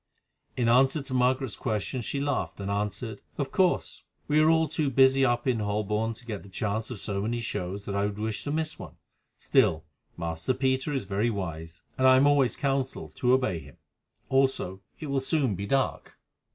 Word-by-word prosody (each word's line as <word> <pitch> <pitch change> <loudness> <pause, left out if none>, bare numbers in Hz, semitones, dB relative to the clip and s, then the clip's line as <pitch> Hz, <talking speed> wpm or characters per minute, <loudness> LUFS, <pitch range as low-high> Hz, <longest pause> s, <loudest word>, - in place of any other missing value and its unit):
In 120 -2 +1
answer 135 +5 +4
to 135 - -6
Margaret's 130 0 +1
question 110 +2 -2
she 140 +4 -3
laughed 140 -6 -2
and 100 0 -3
answered: 105 +1 -3 0.2
"Of 135 -2 -2
course. 185 -2 +1 0.3
We 150 +1 +3
are 155 +1 +5
all 160 0 +4
too 150 -1 -1
busy 135 +1 +5
up 120 -2 +2
in 125 -4 +1
Holborn 105 +2 -1
to 120 - -13
get 105 -4 -5
the 100 - -14
chance 110 +3 -2
of 120 -5 -6
so 100 -1 -2
many 115 +3 -1
shows 100 -3 -4
that 100 - -4
I 100 0 +1
should 105 0 -5
wish 110 0 -3
to 145 - -2
miss 155 +1 -2
one. - - -9 0.4
Still, 80 0 +2 0.3
Master 85 +8 -2
Peter 130 +2 0
is 135 -5 -1
very 100 +4 0
wise, 80 -6 -5 0.2
and 130 - +5
I 130 0 +7
am 135 - +5
always 145 -3 +3
counselled 135 -1 -2
to 125 0 +3
obey 125 -10 +1
him. 70 -3 -14 0.5
Also, 130 -8 +1 0.2
it 155 - -6
will 140 -2 0
soon 135 -3 +1
be 100 +2 -4
dark." 135 +2 -1
120 Hz, 195 wpm, -27 LUFS, 100-135 Hz, 0.5 s, I